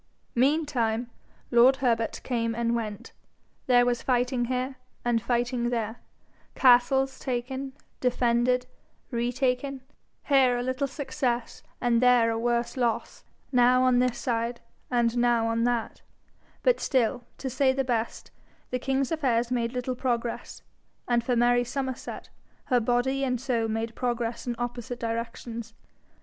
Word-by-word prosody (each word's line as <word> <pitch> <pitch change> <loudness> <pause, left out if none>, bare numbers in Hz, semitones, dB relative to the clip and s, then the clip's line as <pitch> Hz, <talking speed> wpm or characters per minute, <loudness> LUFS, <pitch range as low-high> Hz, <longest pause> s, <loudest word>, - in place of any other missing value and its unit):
Meantime 250 -4 +1 0.4
lord 245 +2 +6
Herbert 235 -4 0
came 230 -2 -1
and 235 0 0
went. 225 0 -5 0.6
There 245 -1 +5
was 240 -1 0
fighting 250 -1 +1
here 255 +2 -2 0.3
and 235 -1 +2
fighting 240 0 0
there, 230 -1 -2 0.6
castles 265 +1 +4
taken, 260 +1 -3 0.3
defended, 250 0 +2 0.5
re 240 0 0
taken, 260 +2 -1 0.4
here 265 -3 +4
a 245 - -2
little 260 +2 -1
success 260 -3 -3 0.2
and 240 -1 +2
there 245 -2 +5
a 225 - -1
worse 235 0 0
loss, 235 -3 -1 0.3
now 250 0 +5
on 255 -1 +4
this 250 -1 +1
side 235 -1 -2 0.3
and 240 -1 +1
now 240 -1 +3
on 230 +1 +1
that; 240 -2 -1 0.6
but - - +3
still, 245 -2 +1
to 270 - -5
say 265 +1 +2
the 270 +1 0
best, 235 -3 -2 0.4
the 250 - -1
king's 270 +2 0
affairs 250 -7 +1
made 235 -2 0
little 250 0 -2
progress; 240 -2 -3 0.4
and 240 -1 +2
for 245 +1 0
Mary 245 +1 +4
Somerset, 260 +1 -5 0.4
her 250 -3 +3
body 245 +4 +1
and 250 -2 0
soul 240 -3 0
made 225 +1 -2
progress 240 -1 -2
in 240 - -1
opposite 240 0 -4
directions. 230 0 -5
245 Hz, 135 wpm, -27 LUFS, 235-255 Hz, 0.6 s, lord